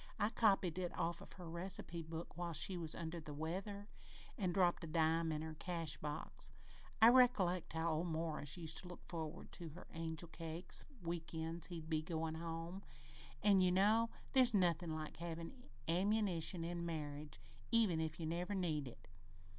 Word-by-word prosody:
I 210 - +2
copied 195 -6 +3
it 180 -1 -1
out 170 0 -1
of - - -11
her 180 - -9
reci 170 +3 0
pe 170 0 -5
book 165 +1 -6
whilst 170 -3 -1
she 185 - +1
was 165 -3 -1
under 170 0 -4
the 150 -2 -7
weather, 195 +6 -3 0.5
an' 190 -7 0
dropped 175 -1 +3
a - - -4
dime 160 +1 +2
in 155 0 -2
her 160 0 -5
cash 165 -1 -1
drawer. 150 0 -4 0.7
I 225 +1 +10
recollect 215 -9 +4
how 165 +1 +1
old 160 +3 0
Morris 160 -2 -2
used 160 -2 -1
to 180 - -7
look 180 - -10
forward 165 -1 -5
to 170 -2 -6
her 165 +4 -10
angel 165 0 -3
cakes 165 +2 -3 0.2
week 170 -1 -3
ends 165 +1 -1
he'd 165 -3 -6
be 160 -1 +1
goin' 160 0 -2
home, 165 +3 -4 0.6
an' 200 -2 +6
you 180 -1 +5
know 215 +5 +4 0.2
there's 255 -4 +6
nothin' 170 -3 +2
like 155 -1 -5
havin' 170 +9 -6 0.2
ammunition, 185 -1 +2
in 170 0 -3
marriage, 150 -3 -4 0.3
even 215 -9 +4
if 160 0 -3
you 165 - -2
never 175 +5 -1
need 155 -7 0
it. 120 - -12
170 Hz, 180 wpm, -39 LUFS, 160-185 Hz, 0.7 s, I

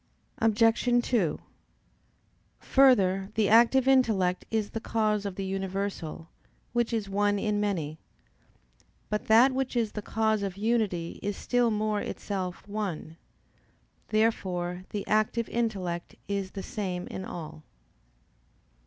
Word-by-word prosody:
Obj. 230 +2 +3
2: 195 -11 +1 1.2
Further, 195 -8 +4
the 215 -2 +2
active 240 +4 +5
intellect 215 -9 +3
is 220 -2 -1
the 225 - -3
cause 215 -2 0
of 195 - -6
the 195 - -4
universal, 190 -4 -4 0.5
which 240 -1 +1
is 220 -3 -1
one 205 +1 +1
in 210 0 0
many. 165 -7 -2 1.1
But 210 - -1
that 235 +5 +6
which 260 -1 -2
is 230 -3 +1
the 210 - -5
cause 220 0 0
of 195 -2 -4
unity 210 -6 -1
is 205 0 -3
still 245 -1 +1
more 215 -1 0
itself 185 -2 -5
one. 195 -6 -4 0.9
Therefore 185 -5 0
the 205 - -4
active 215 +2 +1
intellect 190 -7 -2
is 200 -1 -2
the 195 - -3
same 180 -4 -4
in 190 - -6
all. 160 -4 -7
205 Hz, 125 wpm, -28 LUFS, 190-225 Hz, 1.2 s, that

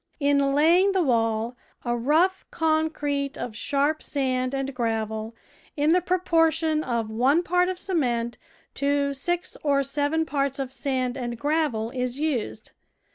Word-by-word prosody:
In 280 -1 +2
laying 345 +6 +4
the 375 -2 +2
wall, 230 -2 0 0.3
a 240 0 0
rough 320 +10 +2
concrete 310 -3 -1
of 230 -3 -5
sharp 285 +6 0
sand 255 -2 -1
and 270 0 -3
gravel, 225 -2 -2 0.4
in 295 +2 +3
the 365 - +3
proportion 325 -3 +2
of 230 -4 -2
one 265 +9 +3
part 360 +1 +2
of 370 - -3
cement 245 -11 -1 0.3
to 280 0 0
six 350 +6 -2
or 280 -2 +2
seven 290 +3 0
parts 275 -2 -1
of 265 -2 -4
sand 260 -2 -1
and 240 -1 -4
gravel, 285 -6 0
is 250 0 -3
used. 260 -7 -2
280 Hz, 140 wpm, -25 LUFS, 245-315 Hz, 0.4 s, laying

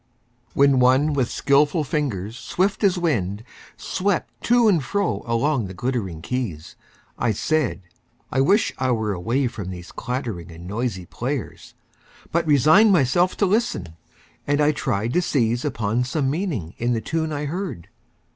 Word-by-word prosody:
WHEN 140 -1 +5
one 130 +4 +4
with 130 -4 0
skillful 145 +3 +2
fingers 120 - -2
swift 190 - -1
as 190 -2 +3
wind 110 - -1 0.3
Swept 190 -1 -1
to 240 -1 +4
and 175 -9 +3
fro 200 +4 -1
along 115 +1 +1
the 95 - -9
glittering 110 -9 -3
keys, 110 -12 -4 0.4
I 115 -2 +1
said: 125 - 0 0.5
I 135 - +2
wish 200 +10 +3
I 130 0 +1
were 110 -3 -1
away 115 +10 0
from 110 -6 -4
these 90 -1 -8
Clattering 120 -9 -4
and 85 +2 -11
noisy 105 -3 -3
players! 125 +5 -5 0.6
but 170 0 0
resigned 155 - +6
Myself 175 +2 +3
to 205 - +3
listen, 200 - 0 0.6
and 145 0 +2
I 150 0 +4
tried 115 -5 -2
to 180 - +3
seize 120 -7 0
Upon 120 -4 0
some 135 +1 -1
meaning 145 - -3
in 120 +1 +1
the 115 - -1
tune 160 +3 -2
I 150 0 -3
heard. 170 - -4
130 Hz, 155 wpm, -23 LUFS, 110-155 Hz, 0.6 s, resigned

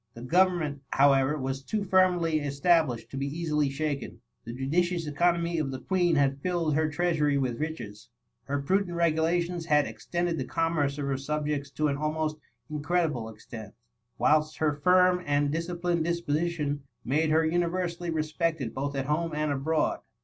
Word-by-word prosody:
The 115 - -9
government, 170 -2 +2
however, 135 +1 +4
was 135 -1 -3
too 210 +9 -2
firmly 180 -4 +3
es 140 -1 -4
tablished 140 -9 +2
to 135 - -6
be 135 +1 -1
easily 150 -1 0
shaken. 140 -4 -3 0.2
The 115 - -6
judicious 170 +7 0
economy 170 +2 +1
of 150 -3 -1
the 130 -1 -5
Queen 175 -1 +1
had 140 -1 +1
filled 170 -3 0
her 155 +1 +2
treasury 150 -2 +1
with 130 -4 -1
riches; 120 -10 -5 0.4
her 140 0 -2
prudent 185 +2 +1
regulations 170 +1 +1
had 150 -2 +4
ex - - -10
tended 175 -1 0
the - - -2
commerce 160 -4 0
of 145 - -3
her 135 -1 -1
subjects 150 0 -2
to 155 - +1
ati 140 -1 -1
al 155 0 0
most 155 -1 -2 0.3
incredible 150 -5 -1
extent; 110 -1 -10 0.4
whilst 155 0 +2
her 155 -2 +1
firm 180 +4 +4
and 145 -1 +1
de 165 +2 0
cided 170 -1 -1
disposition 165 -3 -1 0.2
made 155 +5 +1
her 160 +1 +3
universally 175 +1 -1
respect 160 +1 -1
ed 120 -5 -4
both 140 +1 -3
at 135 -1 -1
home 155 +2 -1
and 150 -1 0
abroad. 150 +3 0
155 Hz, 170 wpm, -28 LUFS, 140-170 Hz, 0.4 s, however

